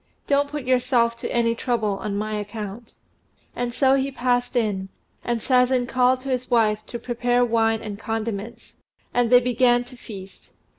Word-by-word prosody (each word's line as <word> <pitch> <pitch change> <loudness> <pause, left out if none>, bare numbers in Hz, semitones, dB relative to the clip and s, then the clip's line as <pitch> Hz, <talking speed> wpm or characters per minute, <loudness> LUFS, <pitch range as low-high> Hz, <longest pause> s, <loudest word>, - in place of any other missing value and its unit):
Don't 285 0 +2
put 295 -1 -5
yourself 250 -2 +2
to - - -4
any 230 -1 +2
trouble 220 -4 -1
on 200 -1 -3
my 215 +1 -3
account." 210 +1 -6 0.6
And 245 0 -2
so 265 +2 +3
he 270 0 +1
passed 245 -1 0
in, 205 -5 0 0.3
and 235 -2 -2
Sazen 250 -1 +3
called 255 +1 +2
to 270 - -6
his 255 -1 -2
wife 215 -3 +2
to 240 - -5
prepare 245 +1 +1
wine 225 -1 +1
and 205 -2 -6
condiments; 225 0 -5 0.4
and 245 -1 +2
they 245 0 +8
began 245 0 +3
to 245 +1 -13
feast. 195 -6 -11
240 Hz, 165 wpm, -23 LUFS, 220-250 Hz, 0.6 s, they